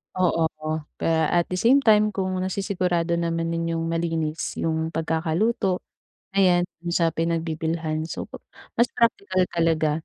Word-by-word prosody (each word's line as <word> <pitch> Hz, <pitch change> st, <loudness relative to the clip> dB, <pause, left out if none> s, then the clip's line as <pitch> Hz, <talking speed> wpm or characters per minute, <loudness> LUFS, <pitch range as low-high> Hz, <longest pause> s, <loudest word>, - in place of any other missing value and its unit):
Oo, 170 Hz, -3 st, +2 dB, 0.2 s
oh, 155 Hz, 0 st, -1 dB, 0.2 s
kaya 160 Hz, -1 st, +1 dB
at 175 Hz, -1 st, +2 dB
the 185 Hz, -, -1 dB
same 270 Hz, +4 st, +5 dB
time 215 Hz, -2 st, +4 dB
kung 190 Hz, -1 st, -1 dB
nasisigurado 180 Hz, -3 st, 0 dB
naman 165 Hz, 0 st, -1 dB
ninyong 165 Hz, 0 st, -1 dB
yung 165 Hz, 0 st, -2 dB
malinis 165 Hz, -2 st, -2 dB
yung 160 Hz, 0 st, 0 dB
pagkakaluto 165 Hz, +5 st, 0 dB, 0.5 s
ayan 180 Hz, -3 st, +4 dB, 0.2 s
do’n 170 Hz, 0 st, -4 dB
sa 165 Hz, -1 st, +3 dB
pinagbibilhan, 160 Hz, -1 st, -2 dB
so -, -, -5 dB, 0.6 s
mas 235 Hz, -, +5 dB
praktikal 200 Hz, -5 st, +2 dB
talaga 165 Hz, -2 st, +2 dB
170 Hz, 135 wpm, -24 LUFS, 165-185 Hz, 0.6 s, same